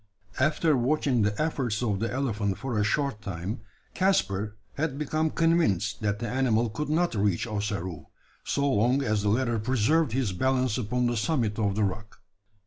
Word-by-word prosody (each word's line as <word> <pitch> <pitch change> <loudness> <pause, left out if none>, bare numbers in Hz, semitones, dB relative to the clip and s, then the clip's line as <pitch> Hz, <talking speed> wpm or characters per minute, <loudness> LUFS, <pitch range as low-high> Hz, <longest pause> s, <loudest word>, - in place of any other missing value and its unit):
After 155 +3 +3
watching 130 -1 +1
the 105 0 0
efforts 130 -8 -1
of 105 -5 0
the 115 +2 -1
elephant 110 -7 -1
for 130 -3 -4
a - - +3
short 120 +1 0
time, 100 +1 -5 0.3
Caspar 105 - +1 0.2
had 145 -2 -2
become 155 +2 0
convinced 110 - +1
that 105 -1 0
the 115 - -4
animal 120 -2 +1
could 150 +7 -4
not 170 +3 +1
reach 100 -3 +1
Ossaroo 100 -6 -4 0.4
so 140 0 0
long 125 +2 +2
as 110 -4 +1
the 100 - +1
latter 120 +1 +1
preserved 130 +5 +2
his 125 -7 0
balance 130 +2 +1
upon 125 +2 0
the 120 0 +1
summit 115 -3 0
of 100 -2 +1
the 105 - +1
rock. 105 +1 -4
115 Hz, 170 wpm, -27 LUFS, 105-140 Hz, 0.4 s, After